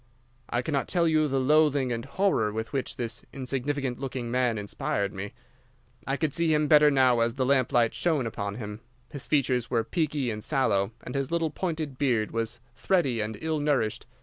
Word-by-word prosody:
"I 120 - 0
cannot 140 0 -1
tell 170 -2 +2
you 155 -1 +3
the 135 -1 0
loathing 145 -1 +3
and 115 0 -3
horror 140 - +1
with 110 +4 -5
which 135 -2 -2
this 115 -2 -5
insignificant 135 0 -3
looking 130 -3 -4
man 125 -2 +1
inspired 100 -1 -2
me. 100 +2 -6 0.7
I 135 +1 0
could 155 -2 -1
see 165 +1 +2
him 150 -1 +2
better 150 0 +7
now 130 -4 +4
as 115 +1 +1
the 130 -1 0
lamp 130 -1 +2
light 120 -4 +3
shone 155 -7 0
upon 100 -2 -4
him. 105 -1 -7 0.3
His 145 - -5
features 130 -5 +1
were 115 -2 +1
peaky 150 -6 -1
and 105 -1 -5
sallow, 110 -9 +1
and 125 - -7
his 135 -1 -1
little 165 -2 0
pointed 155 -6 -3
beard 120 -7 +1
was 115 0 -3
thready 140 - +1
and 105 0 -4
ill 160 -1 -1
nourished. 140 -7 0
130 Hz, 190 wpm, -27 LUFS, 115-150 Hz, 0.7 s, better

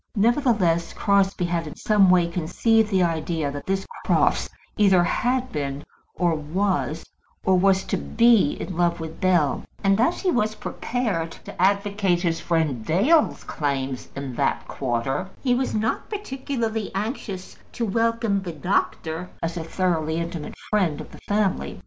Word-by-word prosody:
Nevertheless, 210 - +2
Crosbie 195 -2 +2
had 170 -2 -1
in 150 - -8
some 205 -3 +4
way 180 -1 +5
conceived 210 +6 +1
the 190 -3 +3
idea 160 -3 -1
that 145 0 -7
this 195 0 -1 0.2
Crofts - - +2 0.3
either 190 -4 +5
had 255 +7 0
been, 140 -1 -3 0.3
or 175 -2 +2
was, 160 -1 -1 0.4
or 190 - +4
was 190 0 +3
to - - -2
be, 230 -9 +4
in 185 - -5
love 170 0 +1
with 160 +2 -7
Bell; 175 -6 +2 0.2
and 195 +2 +3
as 330 +8 +1
he 370 - +2
was 215 -5 +1
prepared 215 -12 -2 0.2
to - - -7
advocate 200 -2 +2
his 165 -2 0
friend 155 -9 0
Dale's 230 - +3
claims 135 -3 -3
in 140 -2 -5
that 140 - 0
quarter, 135 +7 -2
he 250 -3 +3
was 255 -1 0
not 220 +1 -1
particularly 260 - -3
anxious 200 -3 -4 0.2
to 235 - -1
welcome 230 -1 +1
the 175 -3 -5
doctor 165 0 -1
as 165 +1 -2
a 170 - -3
thoroughly 165 -2 0
intimate 170 -2 -4 0.2
friend 185 -8 +1
of - - -9
the - - -12
family. 205 -2 0
185 Hz, 155 wpm, -24 LUFS, 165-215 Hz, 0.4 s, way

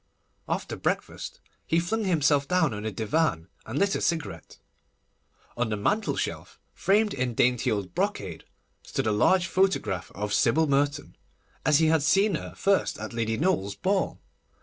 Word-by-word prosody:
After - - -2
breakfast, - - -3 0.3
he 165 - +3
flung 215 +6 -1
himself 150 -5 +2
down 165 -6 +2
on 105 +1 -5
a 110 - -1
divan, 110 - 0 0.2
and 115 +5 -4
lit 200 +4 +2
a - - -1
cigarette. 160 - -3 1.0
On 120 -1 -1
the 105 - -1
mantel 205 - 0
shelf, - - -4
framed 210 +2 +2
in 125 -3 -2
dainty 125 0 +2
old 100 -4 -2
brocade, 165 - -2 0.4
stood - - -3
a 110 - +2
large 180 - +3
photograph 185 - 0
of 105 +1 -3
Sybil 145 +6 +3
Merton, 145 0 0 0.5
as 150 - +4
he 160 - +3
had 160 -1 +3
seen 195 +7 +3
her 155 - -5
first 195 -1 +1
at 110 +2 -6
Lady 110 -1 -1
Noel's 145 - 0
ball. 190 0 0
145 Hz, 160 wpm, -27 LUFS, -, 1.0 s, as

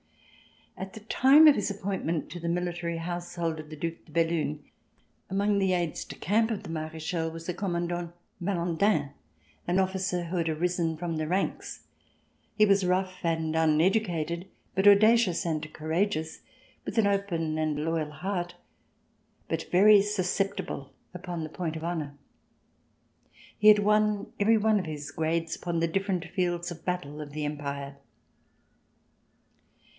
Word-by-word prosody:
At 190 0 -7
the 220 - -9
time 270 +8 +6
of 300 - +9
his - - -1
appointment 190 -5 -3
to 175 - -6
the 170 0 -3
Military 175 -1 -2
Household 170 -1 -3
of 155 -1 -9
the 155 - -7
Due 165 +2 -3
de - - -19
Bellune, 160 -2 0 0.7
among 200 +1 +1
the 190 -1 +2
aides 175 -3 -1
de - - -9
camp 220 +6 +1
of 220 -4 -3
the - - -7
Marechal 160 +1 -3
was 165 0 -9
the 180 - -2
Commandant 175 -2 -2 0.3
Malandin, 170 -4 +1 0.6
an 175 +1 +1
officer 190 -1 0
who 170 +2 -4
had 165 -1 0
risen 165 0 0
from 165 -1 -3
the 155 0 -2
ranks. 185 +4 -2 0.7
He 215 - +5
was 200 -1 +3
rough 185 0 0
and 160 -1 0
uneducated, 170 +1 +1 0.3
but 190 +2 +2
audacious 205 -3 +5
and 155 -2 -2
courageous, 160 +1 -2 0.4
with - - -6
an 225 - +5
open 175 -6 0
and 155 -1 -1
loyal 165 -2 -1
heart, 175 +2 -4 0.9
but - - -2
very 200 +3 +7
susceptible 195 -8 -2 0.2
upon 175 -2 -5
the 155 - -5
point 165 0 -4
of 160 - -6
honor. 160 -4 -3 1.4
He 210 - +4
had 210 0 +9
won 210 0 +1
every 220 +2 +4
one 215 0 +3
of 185 - -4
his 150 -1 -6
grades 165 +2 -1
upon 170 -2 -2
the 165 - +2
different 190 0 -1
fields 175 0 -2
of 165 -1 -10
battle 155 -5 -3
of 145 -1 -9
the 150 0 -3
Empire. 140 -1 -5
175 Hz, 150 wpm, -28 LUFS, 160-195 Hz, 1.4 s, of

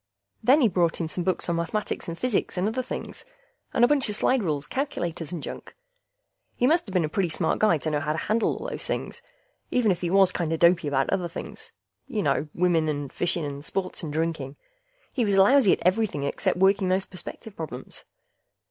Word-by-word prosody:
Then 275 +5 +5
he 240 - +6
brought 175 -4 +1
in 165 - -1
some 175 +2 -3
books 185 0 0
on 170 -1 0
mathematics 180 +5 -2
and 170 0 -5
physics 245 -5 0
and 180 +3 +1
other 235 +4 -1
things, 255 - -7 0.5
and 240 - +4
a - - +3
bunch 280 -4 +3
of 210 - 0
slide 255 +4 +2
rules, 150 -6 -1
calculators, 175 - -3
and 170 -4 -5
junk. - - -8 0.8
He 245 - +1
musta 315 - +2
been 180 -4 +2
a - - -1
pretty 175 +3 0
smart 160 +1 0
guy 215 -6 +4
to 155 +2 -3
know 150 - +1
how 150 - -1
to - - -4
handle 220 +7 0
all - - -6
those - - -5
things, - - -4 0.5
even 235 -5 +2
if 175 - -2
he 175 - -1
was 190 0 +5
kinda 165 -3 -1
dopey 170 -1 +4
about 135 -2 +1
other 185 -3 0
things. 170 - -8 0.4
You 220 -7 -2
know... 150 - +1
women 170 -3 +2
and 145 -2 -3
fishing 170 -2 -1
and 140 0 -6
sports 185 +4 -3
and 160 -4 -5
drinking; 155 -3 -2 0.6
he 245 - +1
was 200 -3 +2
lousy 205 +2 +6
at - - -3
everything 185 -6 +1
except 140 - -1
working 190 0 +3
those 190 +1 +1
perspective 195 +3 -9
problems. 135 -6 -7
180 Hz, 210 wpm, -26 LUFS, 160-210 Hz, 0.8 s, he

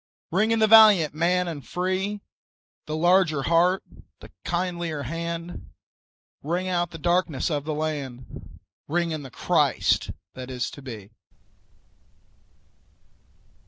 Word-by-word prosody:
Ring 205 +6 +2
in 225 - +2
the 220 - +4
valiant 210 -8 +7
man 180 +3 +1
and 155 -5 -6
free, 190 +3 -2 0.7
The 155 - -3
larger 175 -3 +3
heart, 175 +4 +2 0.4
the - - -14
kindlier 170 -4 -2
hand; 170 +4 -5 0.7
Ring 175 +5 -2
out 175 -2 0
the 165 - -9
darkenss 175 -3 0
of 145 -1 -2
the 155 -1 -2
land, 140 -5 -6 0.3
Ring 170 +1 0
in 155 -1 -3
the 135 - -9
Christ - - +1 0.2
that 130 0 -8
is 125 -1 -3
to 140 - -11
be. 110 -6 -9
170 Hz, 125 wpm, -25 LUFS, 150-180 Hz, 0.7 s, valiant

